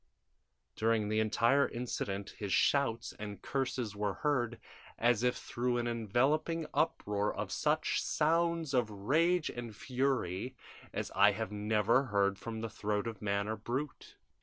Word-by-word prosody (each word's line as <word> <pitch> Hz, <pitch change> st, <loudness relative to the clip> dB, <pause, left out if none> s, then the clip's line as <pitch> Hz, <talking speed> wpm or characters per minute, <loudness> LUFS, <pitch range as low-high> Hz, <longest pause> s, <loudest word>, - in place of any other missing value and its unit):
During 110 Hz, -1 st, +1 dB
the 110 Hz, 0 st, +1 dB
entire 115 Hz, +5 st, +3 dB
incident 100 Hz, -4 st, -3 dB
his 100 Hz, -2 st, -3 dB
shouts 120 Hz, -3 st, +2 dB
and 105 Hz, -1 st, -6 dB
curses 130 Hz, -5 st, -2 dB
were 105 Hz, -1 st, -1 dB
heard, 120 Hz, -6 st, 0 dB, 0.4 s
as 120 Hz, -1 st, +3 dB
if 125 Hz, 0 st, +2 dB
through 120 Hz, +1 st, -1 dB
an 120 Hz, -, -1 dB
enveloping 130 Hz, +9 st, +1 dB
uproar 105 Hz, -10 st, 0 dB
of -, -, -4 dB
such -, -, +1 dB
sounds 165 Hz, -1 st, +1 dB
of 120 Hz, -4 st, +2 dB
rage 155 Hz, -, +1 dB
and 120 Hz, -3 st, -7 dB
fury 125 Hz, -3 st, -1 dB, 0.4 s
as -, -, -4 dB
I 100 Hz, +1 st, +6 dB
had 110 Hz, 0 st, -4 dB
never 105 Hz, +5 st, +2 dB
heard 100 Hz, -3 st, +1 dB
from 115 Hz, -1 st, -5 dB
the 115 Hz, -, -2 dB
throat 105 Hz, 0 st, -1 dB
of 115 Hz, -4 st, -5 dB
man 100 Hz, 0 st, 0 dB
or 110 Hz, 0 st, -2 dB
brute! 130 Hz, +7 st, -5 dB
115 Hz, 145 wpm, -33 LUFS, 105-135 Hz, 0.4 s, I